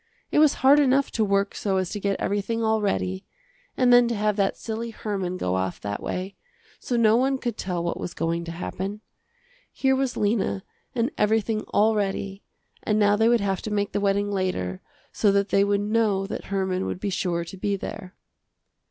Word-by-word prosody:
It - - +3
was 305 -2 +5
hard 285 +2 +8
enough 275 -1 +3
to 225 - +1
work 200 -1 +1
so 195 -2 -1
as 185 -2 -1
to 210 - -3
get 200 0 -1
everything 215 +3 -1
all 220 -1 +2
ready, 95 - -1 0.5
and 245 -1 +5
then 245 0 +7
to 235 - -1
have 210 0 +1
that 200 -2 0
silly 230 +1 -4
Herman 195 -5 -3
go 90 - -1
off 95 -1 -2
that 100 0 -4
way, 185 +2 -4 0.5
so 245 - -2
no 220 -1 +5
one 265 +3 +2
could 240 -4 -3
tell 180 -4 -3
what 170 - -2
was 175 - -5
going 170 +1 -1
to 165 - -5
happen. 190 +4 -5 0.7
Here 265 -1 +2
was 265 -1 -1
Lena 205 -2 0 0.3
and 240 +4 0
everything 215 0 +1
all 220 +2 +3
ready, 195 -1 -2 0.4
and 210 - 0
now 205 -1 +4
they 220 +2 +3
would 240 -2 +3
have 195 -2 -1
to - - -5
make 205 -1 0
the 205 - -1
wedding 200 0 +1
later 140 - -2 0.3
so 205 - +2
that 200 0 +1
they 195 - +4
would 200 0 +1
know 210 -2 +1
that - - -6
Herman 190 -1 -1
would - - -4
be 200 0 -2
sure 175 -2 -1
to 170 - -9
be 200 +2 -1
there. 185 -1 -7
205 Hz, 205 wpm, -25 LUFS, 190-225 Hz, 0.7 s, hard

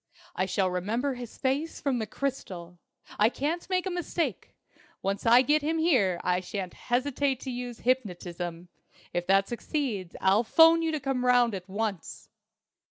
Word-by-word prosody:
I 185 - 0
shall 190 0 +1
remember 225 +10 -1
his 245 -2 -9
face 280 +5 -1
from 270 -4 0
the 220 - -3
crystal. 185 -10 -5 0.4
I 210 +2 +5
can't 315 +8 -3
make 370 0 +1
a 380 - -2
mistake! 350 -1 -3 0.5
Once 195 +3 -1
I 240 +3 +7
get 300 +3 +3
him 315 +3 0
here 245 - +2
I 180 0 +2
shan't 185 0 -5
hesitate 265 +1 0
to 265 - -4
use 245 -1 -6
hypnotism. 180 -8 -2 0.4
If 175 0 -2
that 195 +1 +4
succeeds, 235 - -3
I'll 195 +4 +3
'phone 325 +7 +6
you 325 -1 0
to 310 - -1
come 265 -2 -1
round 245 -2 +4
at 190 -1 -6
once." 200 -2 -4
240 Hz, 165 wpm, -28 LUFS, 190-280 Hz, 0.5 s, I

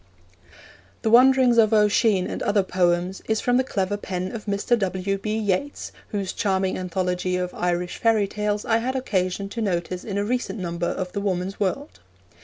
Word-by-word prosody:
The 220 - +1
Wanderings 250 0 +6
of 220 0 +4
Oisin 210 -2 +3
and - - -5
Other 205 -1 +2
Poems 180 0 0
is 220 -1 +1
from 245 0 +2
the 260 - +3
clever 205 -4 -1
pen 185 -2 -4
of 225 -3 -7
Mr. 205 +4 +1
W. 195 0 -1
B. 215 +2 -2
Yeats, 215 +6 -2 0.2
whose 200 -3 -3
charming 190 -2 0
anthology 180 0 -1
of 180 0 -3
Irish 175 0 -2
fairy 220 -3 +3
tales 210 +1 -2
I 225 - +3
had 255 +3 -2
occasion 195 -6 -1
to 230 - -5
notice 180 -3 -2
in 200 -2 -4
a 205 - 0
recent 235 -3 -2
number 175 -2 -3
of 185 -1 -3
the 200 - -3
Woman's 190 -1 -2
World. 180 - -2
200 Hz, 180 wpm, -24 LUFS, 185-220 Hz, 0.2 s, Wanderings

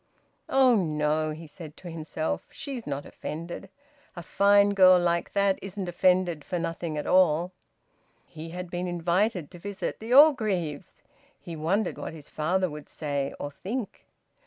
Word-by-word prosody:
"Oh 260 -2 +5
no!" 155 -4 0
he 155 +2 -7
said 155 0 -11
to 175 - -9
himself. 160 -1 -4
"She's 275 -4 -7
not 140 0 -4
offended. 170 +5 -7 0.5
A 175 - -7
fine 200 +3 +4
girl 185 -2 +7
like 170 -1 0
that 200 -1 +2
isn't 195 -1 -5
offended 175 -3 +2
for 180 - -3
nothing 165 -2 -3
at 150 - -3
all!" 180 -1 +3 0.7
He 160 0 -9
had 180 +1 -7
been 180 +1 -3
invited 175 +1 0
to 175 - -11
visit 200 +2 -5
the 225 +2 -7
Orgreaves! 215 - +3 0.4
He 170 - -8
wondered 175 +6 -1
what - - -5
his 150 -3 -11
father 180 +5 0
would 150 -2 -9
say, 145 -3 -3
or 145 - -4
think. 210 - -6
175 Hz, 155 wpm, -27 LUFS, 155-195 Hz, 0.7 s, girl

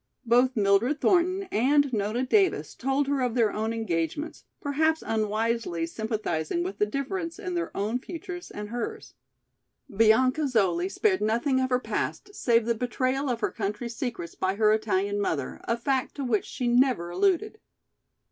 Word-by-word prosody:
Both 245 +3 +3
Mildred 210 +8 +3
Thornton 370 +3 +2
and 280 +4 +3
Nona 215 +4 0
Davis 390 +7 +2
told 270 +2 0
her 280 -1 0
of 250 -2 0
their 225 -4 +2
own 220 +1 -1
engagements, 225 - -3
perhaps 315 +2 +1
unwisely 220 -4 -1
sympathizing 175 -5 -2
with 195 +3 -5
the 210 - +3
difference 330 - -3
in 365 -2 -5
their 345 -1 -1
own 215 +5 -1
futures 355 +4 -7
and 210 0 -7
hers. 420 - -5 0.8
Bianca 255 +7 +4
Zoli 190 -7 +1
spared 385 - +1
nothing 235 +5 +1
of 260 0 0
her 250 - +3
past 410 - -3
save 235 - +2
the 235 - +2
betrayal 255 +4 -1
of 240 -1 -2
her - - 0
country's 220 +2 -4
secrets 220 -10 -4
by 190 +1 -1
her 215 0 +4
Italian 205 -2 0
mother, 145 -9 -2
a 230 - 0
fact 260 +2 -1
to 280 - -4
which 230 -5 0
she 250 - -3
never 240 -8 +2
alluded. 400 - +1
240 Hz, 160 wpm, -27 LUFS, 210-280 Hz, 0.8 s, Bianca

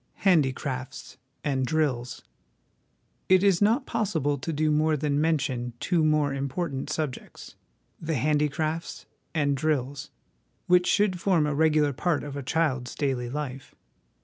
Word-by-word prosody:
Handicrafts 135 -6 0 0.3
and 135 -3 0
Drills. 130 -4 -1 1.1
It 185 0 +5
is 195 -3 +3
not 230 +6 +3
possible 160 - -1
to 165 - -4
do 155 0 +1
more 155 +1 +2
than 145 0 0
mention 130 -6 0
two 175 -3 +1
more 150 -2 +2
important 140 +1 -3
subjects 150 -4 -5 0.5
the 160 -1 -2
Handicrafts 150 +4 -1 0.3
and 145 -2 +2
Drills 140 0 -2 0.6
which 180 0 +4
should 190 -4 +2
form 175 -6 +3
a 150 - -1
regular 150 -1 +3
part 155 +3 0
of 145 -1 -6
a 140 - -4
child's 130 -4 -1
daily 130 -4 -1
life. 135 -1 -6
150 Hz, 130 wpm, -26 LUFS, 135-160 Hz, 1.1 s, It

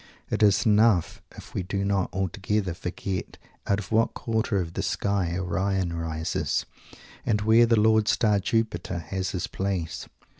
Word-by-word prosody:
It - - 0
is 100 -2 +4
enough 105 -4 +3
if - - -12
we - - -1
do 100 +2 -2
not 100 -2 +1
altogether 95 +1 -1
forget 90 +2 -5 0.3
out 100 - +2
of 105 - -7
what 115 +1 +2
quarter 110 -3 -1
of 85 -2 -4
the - - -2
sky 95 -4 -1
Orion 95 0 -1
rises; 80 -1 -2 0.6
and 105 -2 +1
where 110 +2 +5
the 115 -2 +4
lord 110 0 +4
star 105 -4 +3
Jupiter 95 -4 -1
has 95 +3 -3
his 90 -2 -2
place. 95 -4 -3
100 Hz, 155 wpm, -26 LUFS, 90-105 Hz, 0.6 s, where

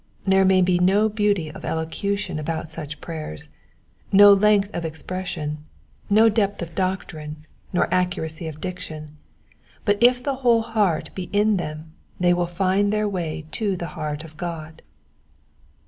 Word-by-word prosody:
There 190 0 +4
may 190 -1 +5
be 180 -1 +2
no 200 +4 +4
beauty 205 -7 0
of - - -11
elocution 175 +2 -2
about 160 +1 -3
such 150 -2 -7
prayers, 155 - -6 0.6
no 205 +1 +9
length 205 0 +3
of 170 - -3
expression, 160 -2 -4 0.5
no 215 +3 +6
depth 205 -2 +1
of 165 -1 -8
doctrine, 155 -4 -3 0.3
nor 180 - +2
accuracy 175 -3 -1
of 155 -1 -7
diction; 155 -4 -7 0.7
but 205 0 +2
if 245 +1 +5
the 275 -1 -1
whole 235 -3 +3
heart 210 -7 0
be 180 -2 -6
in 210 0 +3
them 155 -2 -6 0.3
they 175 0 +4
will 175 0 0
find 190 +3 +1
their 210 0 +1
way 165 -5 -3
to 200 -4 -1
the 170 -1 -5
heart 150 -2 -4
of 155 -1 -13
God. 160 -2 -6
180 Hz, 150 wpm, -23 LUFS, 160-205 Hz, 0.7 s, no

